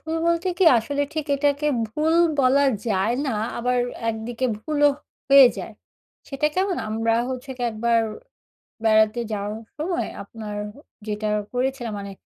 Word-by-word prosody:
ভুল 320 +1 -4
বলতে 340 +2 +1
কি 375 - +4
আসলে 285 +6 -2
ঠিক 310 -2 -2
এটাকে 285 +1 +1 0.2
ভুল 305 +8 0 0.3
বলা 270 +2 +4 0.2
যায় 210 +3 +1
না, 265 - 0 0.3
আবার 250 +1 0 0.3
একদিকে 225 +3 -2
ভুলও 290 +3 +2 0.4
হয়ে 275 -2 +9
যায়। - - -6 0.6
সেটা 275 +2 0
কেমন? 375 -1 0
আমরা 225 +1 0 0.2
হচ্ছে 260 +1 -6
কি 245 - -6
একবার 230 +1 +1 0.8
বেড়াতে 220 +1 +4
যাওয়ার 210 +2 -4
সময় 345 +3 -2
আপনার 210 0 -8 0.2
হু, 255 - -18 0.3
যেটা 210 0 -2 0.2
করেছিলাম 250 -2 -2
মানে 200 0 -7
250 Hz, 140 wpm, -23 LUFS, 220-290 Hz, 0.8 s, হয়ে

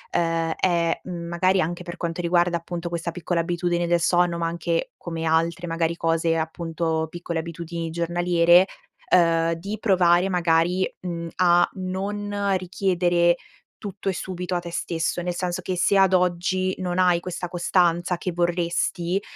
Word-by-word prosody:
uhm, 165 -1 +1
è, 170 -2 +1
mhmm, 170 -2 -6
magari 185 +3 +2
anche 175 +1 -2
per 175 0 -8
quanto 170 0 -3
riguarda 175 0 +2
appunto 170 +1 -6
questa 170 0 -3
piccola 170 0 -1
abitudine 175 0 -1
del 170 0 +3
sonno, 175 0 +2
ma 165 0 -1
anche 170 0 -2
come 165 -1 -5
altre, 165 +2 +1
magari, 165 0 -1
cose, 165 0 +1
appunto, 160 0 -2
piccole 170 0 -4
abitudini 170 0 -5
giornaliere, 175 +2 +3 0.5
uhm, 165 -1 +3
di 195 +6 -5
provare 185 -2 +3
magari, 175 +1 +2
mhmm, 170 -2 -4
a 175 -1 +5
non 200 +2 -2
richiedere 175 -2 +1 0.4
tutto 200 -1 -4
e - - 0
subito 180 0 -4
a - - +1
te 175 0 -8
stesso; 165 +1 -2
nel 175 0 -2
senso 175 -1 -2
che, 185 - -3
se 195 +3 +3
ad 190 -1 +4
oggi 180 +1 +1
non 180 -1 -2
hai 180 -2 +4
questa 180 0 -5
costanza 175 0 +1
che 180 - -3
vorresti, 175 +1 0
175 Hz, 155 wpm, -24 LUFS, 170-180 Hz, 0.5 s, a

